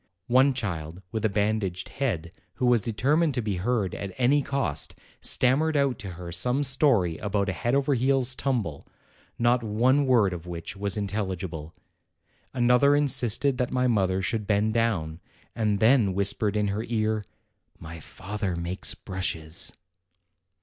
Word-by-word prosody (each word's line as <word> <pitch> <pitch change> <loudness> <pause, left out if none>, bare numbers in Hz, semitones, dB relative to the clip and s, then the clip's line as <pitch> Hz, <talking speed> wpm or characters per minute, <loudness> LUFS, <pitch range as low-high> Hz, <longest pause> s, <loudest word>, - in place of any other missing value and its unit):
One 130 +2 +4
child, 85 -6 -4
with 110 -1 -3
a - - +3
bandaged 100 -3 -1
head, 90 - -2 0.2
who 130 - -1
was 120 -2 +4
determined 140 +8 +1
to 125 - 0
be 105 -3 -2
heard 105 0 -1
at 100 -2 -6
any 130 +3 +3
cost, 90 - -2 0.3
stammered 150 +5 +3
out 140 -3 +1
to 95 -6 -6
her 85 0 -8
some 125 +11 +1
story 120 - +2
about 100 -1 -1
a - - -1
head 120 +8 -1
over 140 +1 +2
heels 130 0 +1
tumble, 115 - -2 0.5
not 120 +1 +2
one 125 +6 +2
word 110 -7 +3
of 85 0 -8
which 85 +4 -6
was 100 +1 -2
intelligible; 95 -6 -4 0.8
another 125 +3 +4
insisted 135 -2 +2
that 125 - 0
my 125 0 0
mother 95 -5 +1
should 110 -2 -2
bend 105 +1 +1
down, 95 -9 0 0.4
and 105 -3 0
then 110 -4 +4
whispered 100 +1 0
in 105 -1 +1
her 105 +3 -2
ear, 110 -2 0 0.5
"My 80 +1 -9
father 95 +3 -5
makes 85 +2 -2
brushes." 85 -4 -4
110 Hz, 150 wpm, -26 LUFS, 95-125 Hz, 0.8 s, One